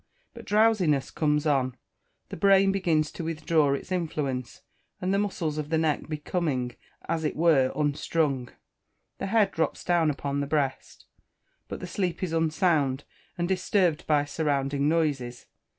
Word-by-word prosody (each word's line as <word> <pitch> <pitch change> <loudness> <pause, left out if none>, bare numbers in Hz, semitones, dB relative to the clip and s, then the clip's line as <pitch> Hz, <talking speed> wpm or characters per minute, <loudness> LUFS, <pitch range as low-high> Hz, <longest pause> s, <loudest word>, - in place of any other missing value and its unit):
But - - -11
drowsiness 205 -10 +2
comes 150 -1 +1
on, 130 -4 +1 0.5
the - - -6
brain 195 +1 +4
begins 165 -6 +1
to - - -6
withdraw 155 -3 +1
its 140 - -8
influence, 150 -8 -3 0.4
and 185 +1 -1
the 200 - +2
muscles 170 -7 -2
of 150 -1 -4
the 160 - +1
neck 155 -1 0
becoming 150 -5 -2 0.3
as 160 -1 -1
it 150 - -1
were 150 -5 +3
"unstrung," 145 -3 0 0.7
the - - -3
head 210 -1 +3
drops 160 - -2
down 170 -3 +2
upon 140 -1 -2
the 140 - -2
breast. 140 -3 -2 0.6
But - - -7
the - - -4
sleep 180 0 -2
is 175 -3 -2
unsound, 155 -4 +1 0.3
and 175 0 -1
disturbed 185 -3 +1
by 145 -2 +3
surrounding 140 -1 0
noises. 140 -7 -1
155 Hz, 150 wpm, -27 LUFS, 140-175 Hz, 0.7 s, brain